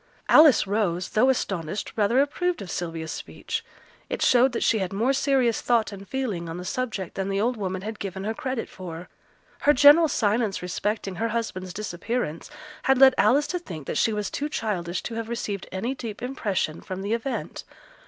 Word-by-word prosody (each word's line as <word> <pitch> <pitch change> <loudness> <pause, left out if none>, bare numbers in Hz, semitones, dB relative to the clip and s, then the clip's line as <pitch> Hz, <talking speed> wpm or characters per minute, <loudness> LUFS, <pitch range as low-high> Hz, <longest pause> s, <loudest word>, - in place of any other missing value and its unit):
Alice 305 -8 +7
Rose, 190 -4 0
though 245 +5 +3
astonished, 195 -7 -2
rather 220 +4 +3
approved 345 - -1
of 180 - -8
Sylvia's 165 -2 -4
speech; - - -5 0.5
it - - -2
showed 255 +1 +5
that - - -1
she 220 - +3
had 190 -2 -2
more 230 +7 +1
serious 265 -4 +2
thought 235 -3 +2
and 200 0 -9
feeling 210 -11 -3
on 165 - -5
the 180 - -7
subject 220 -7 -3
than 195 0 -3
the 195 0 0
old 240 +4 +1
woman 190 -3 -4
had 220 0 -6
given 190 -1 -5
her 220 +2 -1
credit 260 -3 -3
for; 175 -2 -9 0.5
her 295 - +4
general 295 +5 +7
silence 215 -6 0
respecting 195 +1 -2
her 230 - 0
husband's 215 -5 -3
disappearance 200 -2 -3 0.3
had 265 0 +3
led 265 0 +8
Alice 285 +4 +4
to 360 - -2
think 165 - -8
that - - -2
she 225 - +3
was 210 -2 -2
too 295 +1 -2
childish 185 - -2
to 235 - -5
have 225 0 -4
received 210 -5 -4
any 210 +8 -2
deep 230 -4 -7
impression 205 -11 -2
from 190 0 -6
the 205 +3 -1
event. 235 +4 -3
215 Hz, 190 wpm, -25 LUFS, 190-255 Hz, 0.5 s, led